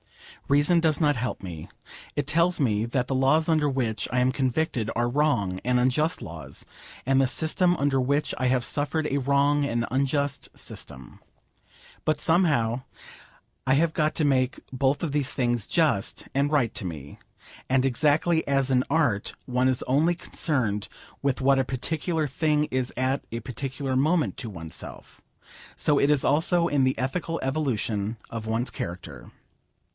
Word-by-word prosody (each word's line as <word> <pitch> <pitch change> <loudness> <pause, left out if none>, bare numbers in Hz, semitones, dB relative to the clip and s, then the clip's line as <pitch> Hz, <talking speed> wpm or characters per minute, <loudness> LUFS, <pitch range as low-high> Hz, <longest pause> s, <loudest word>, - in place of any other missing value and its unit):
Reason 145 +5 +4
does 160 -3 +1
not 150 -3 +3
help 125 -3 -3
me. 85 -4 -7 0.5
It 145 - -1
tells 170 +4 +2
me 110 -6 +1
that 125 +1 -1
the 135 - -1
laws 135 +5 +3
under 155 -3 +2
which 120 -5 -1
I 125 - +1
am 125 +1 +3
convicted 130 -3 -1
are 120 0 +1
wrong 120 -9 0
and 125 0 +2
unjust 150 +7 +1
laws, 85 -2 -8 0.4
and 135 +1 +3
the 135 - +3
system 170 +6 +1
under 140 -2 +1
which 140 +4 0
I 130 - +1
have 125 -1 +1
suffered 145 +5 -1
a 140 - 0
wrong 140 +2 +2
and 120 -4 0
unjust 140 +1 -1
system. 65 -2 -10 0.8
But, 155 -1 +1
somehow, 145 -10 +2 0.9
I 130 - +4
have 160 +2 +2
got 155 0 +1
to 155 - +1
make 130 -2 +1
both 135 +3 +1
of 160 - -1
these 145 -3 0
things 120 -4 -1
just 155 - 0
and 140 +2 +1
right 125 -7 +2
to - - -4
me. 75 -6 -7 0.5
And 130 0 +3
exactly 155 +5 +2
as 135 -1 +1
in 125 -1 +3
Art 140 -10 +1
one 125 +1 +1
is 130 - 0
only 155 +7 +2
concerned 125 -11 -1 0.3
with 140 -2 0
what 135 0 +3
a - - +3
particular 155 +5 -2
thing 150 +2 +1
is 130 -3 -2
at 130 +2 0
a 115 - -3
particular 130 +2 -4
moment 155 +5 +2
to 120 - -5
oneself, 80 -5 -9 0.6
so 145 -1 +2
it 140 - +3
is 145 -2 +2
also 170 +4 +2
in 145 -4 +2
the 130 - +1
ethical 165 +7 -2
evolution 115 -6 -1
of 115 -1 -5
one's 115 +3 -1
character. 85 +1 -7
135 Hz, 165 wpm, -26 LUFS, 125-150 Hz, 0.9 s, Reason